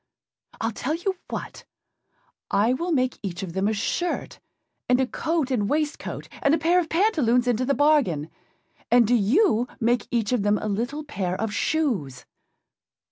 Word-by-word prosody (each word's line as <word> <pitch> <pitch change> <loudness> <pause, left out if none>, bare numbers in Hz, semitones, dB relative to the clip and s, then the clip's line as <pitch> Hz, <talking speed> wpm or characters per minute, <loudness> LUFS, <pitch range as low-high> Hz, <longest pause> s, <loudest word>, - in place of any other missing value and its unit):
Iâll 225 - -1
tell 295 +8 -2
you 365 +2 -3
what, - - -6 0.9
I 210 +5 +3
will 340 +7 -2
make 255 -4 0
each 190 -2 -5
of 175 -3 -6
them 190 +2 0
a 220 - +1
shirt, 340 - -2 0.5
and 250 0 +4
a 265 - +3
coat 310 +1 -1
and 210 -5 0
waistcoat, 300 0 -2
and 280 +2 +4
a - - 0
pair 335 +3 +3
of 330 -3 -2
pantaloons 300 - +2
into 245 +1 +1
the 280 +1 +1
bargain; 270 - +2 0.6
and 240 -1 +5
do 235 - +1
you 245 - +3
make 240 +1 +1
each 230 -3 0
of 250 -4 +2
them 205 +1 +2
a 215 - -4
little 240 +9 -2
pair 195 -12 -3
of 220 -1 -2
shoes. 210 - -1
250 Hz, 170 wpm, -24 LUFS, 210-305 Hz, 0.9 s, and